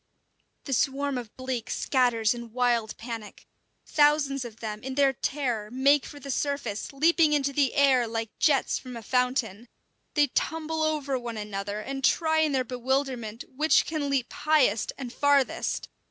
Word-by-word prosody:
The 275 - -4
swarm 275 +2 0
of 230 -3 -11
bleak 255 -3 -4
scatters 240 -4 +2
in 235 -2 -9
wild 240 -3 +1
panic. 230 -2 -8 0.4
Thousands 290 -2 +2
of 235 -3 -8
them, 215 -1 -5
in 265 0 -5
their 275 -1 +4
terror, 245 -6 -2
make 270 +3 +3
for 290 - -10
the 280 -1 -6
surface, 270 -7 -2
leaping 315 +2 +3
into 280 -1 +1
the 275 -2 +1
air 265 -4 +4
like 225 -1 -3
jets 285 -4 +2
from 250 -2 -9
a 230 - -9
fountain. 250 -3 0 0.5
They 295 -2 +5
tumble 320 +3 -2
over 295 -4 0
one 235 -2 -6
another 205 0 -4
and 270 +4 -5
try 315 +3 +3
in 310 -1 +2
their 260 -2 +1
bewilderment 250 -2 -2
which 305 +4 +2
can 305 -3 -2
leap 270 -3 -1
highest 290 -9 +2
and 250 -3 -7
farthest. 285 -2 +1
260 Hz, 160 wpm, -27 LUFS, 235-285 Hz, 0.5 s, They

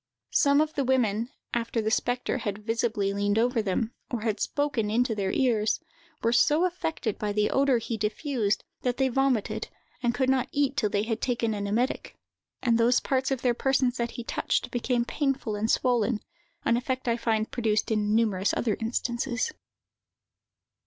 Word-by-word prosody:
Some 285 0 +5
of 310 0 -1
the 280 - 0
women, 235 -3 +1 0.2
after 230 0 -1
the 220 0 0
spectre 245 +2 0
had 210 -2 -4
visibly 225 -3 0
leaned 205 +1 +1
over 240 0 +2
them, 215 +3 -1 0.2
or 240 -3 -3
had 220 -1 -1
spoken 285 -7 0
into 235 +2 +2
their 195 -3 -1
ears, 225 -5 +2 0.4
were 230 +1 +2
so 300 +8 +4
affected 325 - -2
by 210 -1 -1
the 210 0 +1
odor 270 -2 +3
he 230 0 -3
diffused 215 -1 -1 0.2
that 250 -1 -1
they 265 -1 +2
vomited, 260 -4 0 0.3
and 240 -1 +1
could 260 - +1
not 260 -1 +2
eat 280 -1 +1
till 220 -8 +1
they 205 0 0
had 225 0 -2
taken 235 -3 0
an 205 -1 -3
emetic; 235 +6 -1 0.5
and 235 -2 +3
those 240 +2 +4
parts 265 -1 0
of 265 -2 -2
their 245 -2 +3
persons 260 0 +1
that 235 0 -1
he 240 - -4
touched - - -1
became 245 0 0
painful 270 -6 -1
and 215 +2 -1
swollen, 240 -3 +2 0.4
an 235 - +3
effect 255 +1 -3
I 235 - +3
find 225 -2 0
produced 220 -3 0
in 210 -1 +1
numerous 205 -4 +2
other 220 -4 0
instances. 240 - -1
235 Hz, 175 wpm, -27 LUFS, 215-260 Hz, 0.5 s, Some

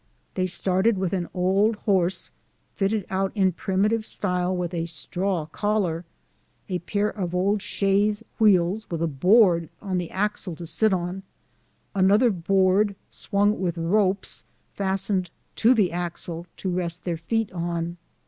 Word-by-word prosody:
They 185 -1 0
started 190 +4 +1
with 185 -1 -1
an 180 -3 -2
old 195 +5 +2
horse, 190 -3 0 0.4
fitted 200 0 0
out 190 0 0
in 190 -3 +3
primitive 200 +5 0
style 180 -3 -1
with 175 0 -3
a 165 -1 -2
straw 180 0 -2
collar, 180 -1 -1 0.6
a 180 -2 -2
pair 205 +4 -1
of 180 -4 -4
old 200 +3 +1
chaise 205 +2 +1 0.2
wheels, 200 0 +3
with 170 -1 -2
a - - +3
board 170 - +4
on 190 -3 -2
the 175 -2 -4
axle 200 -3 -2
to 170 - -8
sit 175 +7 +2
on, 180 +1 -2 0.7
another 200 +5 +4
board 195 +2 +2 0.2
swung 205 +1 +1
with 175 -2 -1
ropes, 190 +3 0 0.3
fastened 190 -1 0 0.3
to 240 +3 +5
the 200 -6 +2
axle, 170 0 -4
to 190 - -3
rest 175 -1 -2
their 175 -2 -1
feet 225 +6 -1
on. 170 -1 -3
190 Hz, 145 wpm, -25 LUFS, 175-205 Hz, 0.7 s, to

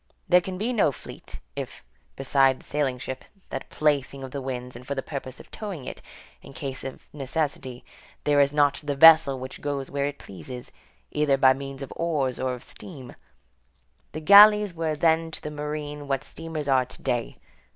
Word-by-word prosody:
There 180 0 +6
can 185 +1 -6
be 225 +6 -1
no 205 -10 +3
fleet, - - -11 0.2
if, - - -6 0.3
beside 135 -1 +3
the - - -19
sailing 140 -3 -1
ship, 130 +1 -6 0.3
that 135 - -5
plaything 140 -3 0
of 130 - -7
the 140 - -4
winds, 125 -1 -5
and 120 - -10
for 140 +3 -4
the 135 - -3
purpose 130 -3 -6
of - - -15
towing 195 -11 -6
it, - - -7 0.4
in - - -13
case 135 -1 -5
of 135 - -8
necessity, 135 -3 -3 0.4
there 145 -1 +3
is 140 0 +3
not 145 -1 +2
the 145 -1 -2
vessel 160 -2 +8
which 130 +1 -8
goes 140 -2 -3
where 140 0 0
it 145 0 -5
pleases, 100 +7 -9 0.4
either 150 -2 +2
by 130 -1 +6
means 135 0 -7
of 135 - -8
oars 150 -7 -1
or 130 -1 -1
of 125 - -12
steam; 135 -9 -11 1.0
the 155 - -6
galleys 205 +2 +8
were 160 -2 -2
then 165 +1 +2
to 160 - -8
the 150 - -5
marine 150 -1 -5
what 135 0 -1
steamers 160 -2 -6
are 130 -2 +3
to 125 - -13
day. 120 -1 -2
140 Hz, 190 wpm, -26 LUFS, 130-155 Hz, 1.0 s, vessel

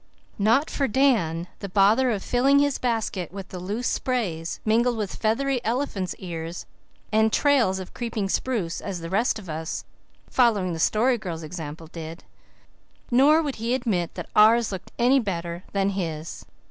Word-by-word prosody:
Not 230 +9 +3
for 275 - 0
Dan 210 - +2
the 200 - -6
bother 210 +7 +4
of 210 -5 -1
filling 270 +3 +3
his 285 -1 +2
basket 220 -8 -2
with 195 0 -8
the 185 - -7
loose 205 +7 -3
sprays, 185 -11 -2
mingled 235 +2 +2
with 210 -3 -3
feathery 250 +3 0
elephant's 225 -6 -2
ears 170 -1 -6 0.5
and 220 0 +3
trails 255 -11 +3
of 185 -1 -8
creeping 230 -4 -3
spruce, 195 -5 -1
as 190 -4 -5
the 165 +1 -6
rest 220 +4 +2
of 205 -4 -10
us, 160 +1 -4 0.4
following 210 -8 +2
the 165 - -5
Story 235 +8 +2
Girl's 170 -5 -5
example, 160 -1 -7
did. 165 0 -8 0.9
Nor 290 +6 +5
would 285 -3 -3
he 230 +3 0
admit 210 -10 -1
that - - -6
ours 220 +2 +5
looked 190 -2 -7
any 250 +3 +4
better 175 -5 -4
than 195 0 +1
his. 165 -4 -5
210 Hz, 160 wpm, -25 LUFS, 175-245 Hz, 0.9 s, Nor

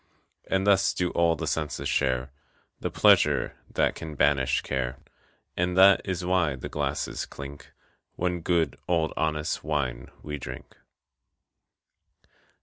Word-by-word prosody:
And 95 0 +1
thus 100 -2 +3
do 90 -1 0
all 85 -1 +2
the - - -4
senses 75 -2 -2
share 65 +1 0 0.5
The - - -2
pleasure - - +4
that - - +1
can 80 -2 -8
banish 65 -1 +2
care. 65 -1 -2 0.6
And 90 +1 0
that 95 +1 +7
is 90 -2 -3
why 90 -6 +2
the 65 - -7
glasses - - -3
clink 70 0 -10 0.4
When 90 -1 -1
good 85 -1 0
old 85 -3 +1
honest 75 -1 -1
wine 70 -6 -2
we 75 -1 -5
drink. - - -9
80 Hz, 130 wpm, -27 LUFS, 70-90 Hz, 0.6 s, that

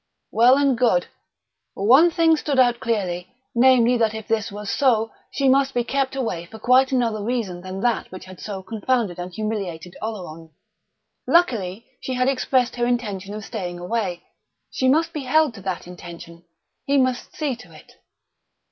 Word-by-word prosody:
Well 245 +4 +5
and 280 -2 +3
good. 230 -7 +2 0.7
One 260 - +6
thing 330 -1 +3
stood 295 -2 -2
out 245 -2 +4
clearly: 185 -6 -2 0.3
namely, 245 0 +5
that 220 -2 +1
if 220 -1 -7
this 225 -3 -1
was 205 +1 -7
so, 225 -5 +2 0.2
she 275 - 0
must 270 0 +3
be 240 - +2
kept 270 +1 -1
away 225 -10 -3
for 220 - -11
quite 255 +4 +4
another 235 -5 0
reason 215 -7 -2
than 185 +1 -6
that 240 0 0
which 185 - -9
had 185 -1 -12
so 195 -3 -6
confounded 220 -3 -1
and 180 +1 -5
humiliated 185 -5 -4
Oleron. 165 -7 -7 0.7
Luckily 230 - +2
she 260 - -4
had 255 0 +1
expressed 255 -2 +1
her 240 0 +1
intention 205 -5 -2
of 215 -1 -7
staying 175 -1 -5
away; 180 -1 -3 0.5
she 260 - 0
must 320 +5 +2
be 300 - -3
held 310 0 +3
to 200 - -11
that 190 -2 -4
intention. 170 -1 -11 0.4
He 280 0 +3
must 255 -2 0
see 290 -5 -1
to 205 -8 -15
it. 155 - -17
225 Hz, 170 wpm, -22 LUFS, 185-255 Hz, 0.7 s, One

